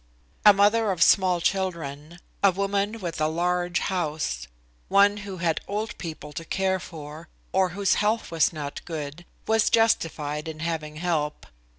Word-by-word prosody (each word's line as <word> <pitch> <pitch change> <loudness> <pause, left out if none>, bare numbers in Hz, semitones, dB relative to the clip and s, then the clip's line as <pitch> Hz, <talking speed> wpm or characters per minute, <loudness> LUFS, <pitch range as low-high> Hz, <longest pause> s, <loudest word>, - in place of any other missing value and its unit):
A 210 - +10
mother 205 +2 +3
of 175 -3 +3
small 185 -2 +4
children, 170 -4 -2 0.3
a 200 - +8
woman 200 +3 -1
with 170 -3 -4
a 155 - +3
large 175 +2 0
house, 150 - -2 0.4
one 200 +1 +5
who 200 -2 -7
had 170 -2 0
old 210 +2 -3
people 155 -3 -7
to 165 - -5
care 190 +2 0
for, 160 -2 -9 0.2
or 190 -1 +2
whose 200 -2 +3
health 215 0 0
was 165 -2 +3
not 145 -3 -6
good, 155 0 -6 0.2
was 220 0 +3
justified 160 -9 +1
in 155 -1 -6
having 160 -2 -3
help. 155 -3 -2
175 Hz, 155 wpm, -25 LUFS, 155-200 Hz, 0.4 s, A